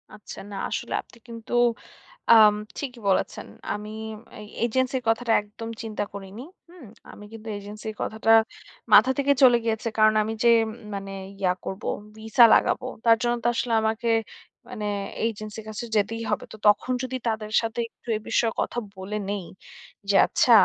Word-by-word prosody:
আচ্ছা। 210 - -10
না। - - -6
আসলে - - -4
আপনি - - -21
কিন্তু 230 -1 -9 0.8
আম 215 -1 +8 0.2
ঠিকই 250 -4 -5
বলেছেন। 190 - 0 0.3
আমি 210 +1 -6 0.5
এই 210 - -9 0.2
এজেন্সির 260 +2 0
কথাটা 230 +1 +1
একদম 210 +2 -9
চিন্তা 215 -2 -3
করিনি। 200 +4 -8 0.3
হুম? 345 -7 -14 0.3
আমি 210 - -12
কিন্তু 225 0 -11
এজেন্সির 210 +2 -8
কথাটা 220 +1 0 0.6
মাথা 255 +5 +8
থেকে 280 0 +3
চলে 245 -2 +8
গিয়েছে। 225 0 -1
কারণ 215 0 +5
আমি 220 +1 -3
যে 235 - +6 0.5
মানে 195 0 -6 0.3
ইয়া 185 -2 +2
করবো, 190 +2 -4 0.3
ভিসা 220 +2 +5
লাগাবো। 255 - +2 0.2
তার 230 -1 +6
জন্য 240 0 +1
তো - - +2
আসলে 235 0 -1
আমাকে 220 +1 -1 0.6
মানে 210 - -5 0.4
এজেন্সির 215 0 -6
কাছে 215 +2 -5
যেতেই 225 +3 0
হবে। - - -1
তো 215 - -9
তখন 210 +4 +3
যদি 255 0 -3
তাদের 215 -1 -2
সাথে 225 +1 -4
একটু - - -32
এ - - -8
বিষয়ে 225 -2 +2
কথা - - -3 0.2
বলে 195 +3 -4
নেই, 200 -3 -3 0.6
যে 200 - +3
আচ্ছা 245 - +2
220 Hz, 160 wpm, -25 LUFS, 210-235 Hz, 0.8 s, আম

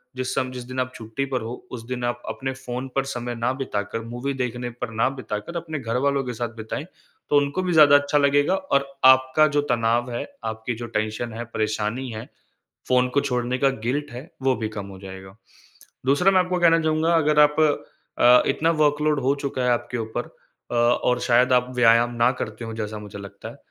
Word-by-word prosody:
जिस 130 0 -3
सम 130 -1 0
जिस 125 -1 -7
दिन 130 +1 -5
आप 130 0 -1
छुट्टी 115 +4 -4
पर 125 - 0
हो, 115 +2 -5 0.2
उस 120 -3 -6
दिन 125 -1 -4
आप 120 0 -2
अपने 135 0 -3
फ़ोन 130 0 -6
पर 135 - +2
समय 120 -2 -4
ना 115 +2 0
बिताकर, 115 -5 -3
मूवी 120 +4 -4
देखने 125 -1 -3
पर 120 0 -6
ना 110 +2 +1
बिताकर 130 +2 -6
अपने 160 -3 -5
घरवालों 135 +3 0
के 125 - -4
साथ 120 +1 -3
बिताएँ, 110 +7 -5 0.4
तो 145 - +4
उनको 145 +5 +1
भी 180 -2 0
ज़्यादा 145 -2 +7
अच्छा 145 +1 0
लगेगा। 145 +4 +3
और 140 -8 0 0.2
आपका 130 +3 +6
जो 145 - +4
तनाव 120 +1 +1
है, 120 - -3 0.2
आपकी 110 +2 -3
जो 120 +1 -6
टेंशन 110 +2 -3
है, 115 - -5
परेशानी 110 +3 -2
है, 110 0 -6 0.6
फ़ोन 125 0 +3
को 140 - +4
छोड़ने 125 -2 -1
का 135 0 +3 0.2
गिल्ट 145 +3 -1
है, 130 +8 -9
वो 130 0 +3
भी 110 - -3
कम 100 -2 -6
हो 95 -1 -10
जाएगा। 95 0 -10 0.7
दूसरा 145 +8 +4
मैं 185 - +5
आपको 180 0 0
कहना 165 -1 +5
चाहूँगा 160 +1 +1
अगर 150 -2 +3
आप 150 0 +5 0.6
अ, 125 +1 +7
इतना 165 +1 +2
वर्क 145 0 +2
लोड 150 -2 +2
हो 135 +2 +2
चुका 135 -2 -2
है 125 - +2
आपके 120 0 -1
ऊपर 110 +2 -3 0.5
अ, - - -1
और 120 +1 +2
शायद 125 +1 +3
आप 125 0 +3
व्यायाम 120 0 +5
ना 120 +1 +4
करते 110 +2 -6
हों 115 -1 -6
जैसा 110 -1 -4
मुझे 105 -1 -9
लगता 100 0 -9
है, - - -11
125 Hz, 210 wpm, -23 LUFS, 115-140 Hz, 0.7 s, ज़्यादा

